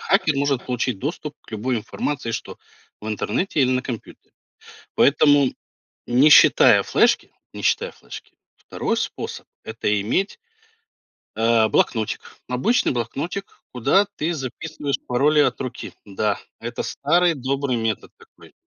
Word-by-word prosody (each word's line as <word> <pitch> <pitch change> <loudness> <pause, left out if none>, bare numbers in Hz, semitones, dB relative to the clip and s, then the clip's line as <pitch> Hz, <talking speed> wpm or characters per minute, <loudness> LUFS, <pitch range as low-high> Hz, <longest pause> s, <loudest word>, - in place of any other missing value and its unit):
хакер 160 -7 +2
может 140 -2 0
получить 125 -3 -1
доступ 150 - -5
к - - -19
любой 120 +4 -1
информации, 115 +2 -3
что - - -6 0.4
в 105 - -9
интернете 115 - -1
или 130 -2 +3
на 130 0 +1
компьютере. 120 -4 -8 0.6
Поэтому 145 -1 +4 0.5
не 130 +5 +4
считая - - +7
флешки - - +2 0.2
не - - -8
считая - - +1
флешки, - - -12 0.2
2 - - -3
способ- - - -5 0.2
это 110 -2 -1
иметь 185 - -1 1.0
а, 115 0 +3
блокнотик. 110 0 0 0.3
Обычный 130 - +1
блокнотик, 140 - -3 0.3
куда 140 - +3
ты 160 +3 -1
записываешь 145 +1 -4
пароли 145 +5 +3
от 130 -4 +1
руки. 130 -2 -6
Да, 105 +1 -1 0.2
это 120 +1 -4
старый 170 +4 +2
добрый 135 -1 -1
метод 115 -3 -3
такой. - - -19
130 Hz, 130 wpm, -22 LUFS, 115-150 Hz, 1.0 s, считая